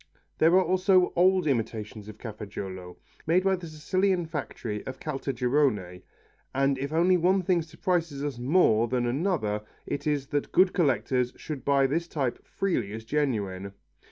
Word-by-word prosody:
There 165 +3 +5
are 190 - +6
also 185 +1 +3
old 185 0 +4
imitations 110 -4 -2
of 110 - -10
Cafaggiolo, 100 -5 -7 0.3
made 175 +3 +3
by 195 0 +3
the 175 -2 -8
Sicilian 180 +4 0
factory 120 -8 -5
of 130 - -6
Caltagirone, 125 - -1 0.5
and 135 0 +2
if 140 +2 -3
one 180 +3 +3
thing 175 -1 +2
surprises 165 -3 -2
us 145 -4 -3
more 120 -5 +3
than 125 0 0
another 120 - 0 0.2
it 145 +1 -4
is 145 -2 0
that 145 -1 -2
good 185 0 +4
collectors 130 -6 +1
should 145 -5 -7
buy 140 -1 +3
this 165 +5 0
type 135 -7 -2
freely 125 - -2
as 110 0 -7
genuine. 100 -9 -2
140 Hz, 150 wpm, -27 LUFS, 115-170 Hz, 0.5 s, are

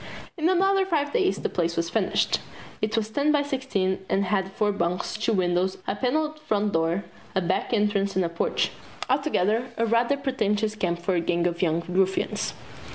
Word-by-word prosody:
In 330 -1 +1
another 385 +1 +3
five 300 -6 0
days 195 - +2
the - - -2
place 170 -1 -1
was 165 0 -1
finished. - - +1 0.4
It 215 +1 0
was 220 -1 -1
ten 285 +5 +2
by 295 -1 +3
sixteen, 255 -10 -1
and 195 +1 +2
had 190 0 0
four 210 0 +1
bunks, 180 -2 -1
two 215 +2 0
windows, 185 -1 +1
a - - -1
paneled 305 +7 0
front 210 -8 0
door, 165 +4 +1 0.3
a - - +4
back 175 +1 -1
entrance 205 -3 +1
and 190 -2 +2
a - - +1
porch 170 - 0 0.4
altogether 225 - +1
a 230 - +2
rather 235 +4 +2
pretentious 220 -6 0
camp 180 -5 -1
for 190 - +1
a 175 - +2
gang 170 0 0
of 170 -1 -1
young 170 -1 +1
ruffians. 190 +1 0
205 Hz, 185 wpm, -26 LUFS, 180-260 Hz, 0.4 s, a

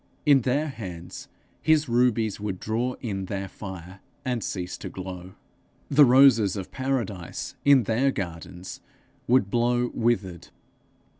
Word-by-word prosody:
In 140 -3 +6
their 135 +6 0
hands 90 -9 -8 0.3
his 155 -2 +3
rubies 115 -3 +1
would 100 -3 -4
draw 120 +4 -1
in 100 -5 -3
their 95 0 -4
fire, 95 -1 -9 0.3
and 125 -4 -1
cease 90 -2 -4
to - - -6
glow. 95 0 -8 0.6
The 145 +1 +7
roses 125 -6 +5
of 95 -2 -6
paradise 120 -10 -3
in 140 -3 +6
their 115 +6 +1
gardens 90 -2 -7 0.5
would 120 -5 +3
blow 120 +1 +1
withered. 95 -7 -1
110 Hz, 130 wpm, -26 LUFS, 95-125 Hz, 0.6 s, The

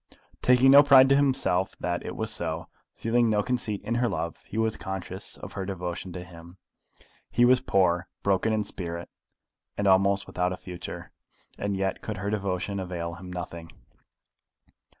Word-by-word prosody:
Taking 125 +1 +5
no 140 +1 +10
pride 135 -2 +7
to 140 - +6
himself 130 -10 +1
that 85 0 -2
it - - -6
was - - -2
so, - - -3 0.3
feeling 115 0 +2
no 105 -1 +2
conceit 120 -5 -2
in 115 - -2
her 120 - +2
love, 85 0 -3
he 110 - -7
was 110 0 +1
conscious 95 -1 -5
of - - -9
her 95 - -4
devotion 90 -1 -5
to 90 - -6
him. 85 0 -13 0.7
He 120 - +4
was 125 0 +5
poor, 90 -1 +2 0.2
broken 100 +2 +2
in 110 -1 +1
spirit, 85 -3 -5 0.7
and 100 - -1
almost 100 +1 +4
without 90 0 -1
a - - -6
future; 90 -2 -8 0.4
and 100 -1 -2
yet 95 0 -1
could 110 -3 -5
her 100 +2 -3
devotion 100 -1 -2
avail 85 -2 -4
him 90 +2 -9
nothing! 85 -2 -6
95 Hz, 170 wpm, -27 LUFS, 90-110 Hz, 0.7 s, no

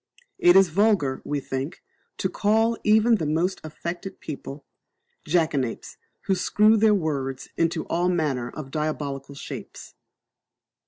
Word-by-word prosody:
It 175 +1 +6
is 195 -2 +6
vulgar, 190 -7 +2
we 145 -1 -2
think, 135 +3 -5 0.3
to - - 0
call 220 +4 +2
even 220 +2 +4
the 160 - -2
most 170 +5 0
affected 170 +4 -6
people 140 -1 -8 0.6
"jackanapes, 150 -7 -1 0.2
who 195 - 0
screw 210 +4 +4
their 215 -1 +4
words 140 -7 -3
into 165 0 0
all 175 +2 0
manner 145 -9 -1
of 135 -1 -8
diabolical 140 -2 -3
shapes." - - -9
160 Hz, 125 wpm, -25 LUFS, 140-195 Hz, 0.6 s, It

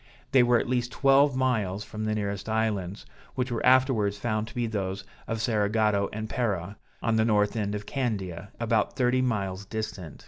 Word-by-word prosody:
They 135 - +6
were 120 0 +4
at - - -1
least 125 -1 0
twelve 140 0 +4
miles 110 -7 0
from 110 +1 -5
the 110 0 0
nearest 100 0 -3
islands, 105 -4 -1 0.3
which 125 -1 -1
were 115 - -2
afterwards 125 -6 +3
found 110 0 -1
to - - -12
be 120 -1 0
those 95 -3 -3 0.2
of 115 - -2
Cerigotto 105 -2 +1
and 110 +1 -4
Pera, 100 -5 -2 0.3
on 115 -1 +2
the 110 - +4
north 105 -2 +2
end 105 -2 -1
of 105 0 -5
Candia, 105 -8 -3
about 115 -2 +1
thirty 125 0 +2
miles 100 -6 -1
distant. 110 -6 -6
110 Hz, 180 wpm, -27 LUFS, 100-120 Hz, 0.3 s, They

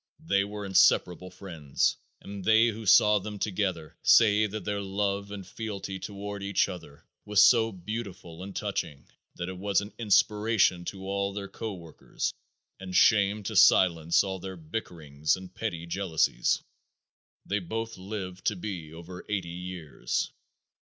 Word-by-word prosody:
They 100 -10 +3
were 105 0 -6
inseparable 90 -1 +3
friends, 85 -7 -1 0.3
and 100 -1 -8
they 110 +3 +5
who 110 -1 -6
saw 105 +2 +6
them 105 +1 -7
together 95 -6 -2
say 110 -1 +5
that 105 +1 -6
their 105 -1 -1
love 100 0 -2
and 100 -2 -7
fealty 100 -3 -6
toward 100 +1 -6
each 100 0 +1
other 90 -7 -10 0.2
was 105 0 +5
so 115 0 +5
beautiful 95 -3 -7
and 95 +1 -8
touching 80 -8 -3 0.3
that 85 - -4
it 95 -1 -6
was 100 0 +2
an 100 +1 -7
inspiration 105 -4 +3
to 95 +1 -6
all 100 0 -1
their 100 0 -5
co 110 0 -6
workers 85 -3 -5 0.5
and 95 -1 -7
shamed 105 0 +4
to 110 - -3
silence 85 -3 +5
all 95 -1 -4
their 95 0 -7
bickerings 80 -4 -2
and 95 0 -11
petty 90 -6 -4
jealousies. 85 -2 0 0.8
They 105 - 0
both 115 +5 -4
lived 95 -1 -7
to 105 - +2
be 90 -5 -6
over 85 +2 -10
eighty 95 -5 -2
years. 85 -7 -4
100 Hz, 150 wpm, -28 LUFS, 90-105 Hz, 0.8 s, saw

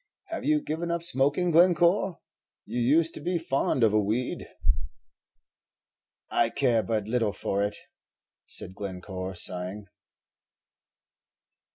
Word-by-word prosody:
Have 330 - -4
you 300 0 +3
given 165 +2 -3
up 170 0 -1
smoking, 145 +4 +2
Glencore? 175 +2 +4 0.4
you 120 +2 -3
used 155 +7 +3
to - - -6
be 175 +3 0
fond 135 -5 0
of 110 -2 +4
a 110 - +4
weed." 110 +5 -2 1.8
"I - - +2
care 120 -5 +2
but 110 -2 -2
little 110 -3 0
for 100 -1 -1
it," 105 +1 -1 0.7
said 90 - -4
Glencore, 95 -1 -6
sighing. 90 +4 0
125 Hz, 115 wpm, -27 LUFS, 105-170 Hz, 1.8 s, Glencore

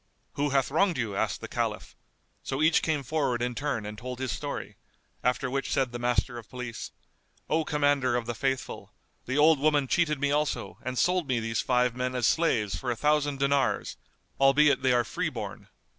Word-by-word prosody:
"Who 145 +1 0
hath 135 -1 +1
wronged 175 +2 +2
you?" 115 -5 -2
asked - - -1
the - - -6
Caliph; - - -3 0.5
so 135 +3 -2
each 160 +1 +4
came 155 -3 0
forward 140 -3 0
in 125 +1 -1
turn 135 -4 -2
and 105 0 -7
told 125 +1 -6
his 130 -1 -3
story, - - -5 0.5
after 125 0 +1
which 135 +2 -2
said 130 -2 +1
the 120 - -5
Master 120 0 0
of 110 - -14
Police, 120 -3 -6 0.6
"O 160 +1 +1
Commander 145 -4 +1
of 120 -1 -1
the 120 - -3
Faithful, 135 +1 -3 0.3
the 130 +3 -1
old 155 0 +5
woman 145 -1 +3
cheated 150 -1 +1
me 140 0 +1
also 150 +1 -1
and 130 0 -4
sold 180 +5 +2
me 125 -3 +1
these 115 0 -1
five 125 -1 +1
men 125 0 -2
as 125 -2 +1
slaves 115 -9 +2
for 130 - -4
a 120 - 0
thousand 145 +2 +1
dinars, 140 0 +1 0.4
albeit 135 0 +5
they 130 -1 +3
are 120 -1 +3
free - - -2
born." - - -7
135 Hz, 195 wpm, -28 LUFS, 120-145 Hz, 0.6 s, old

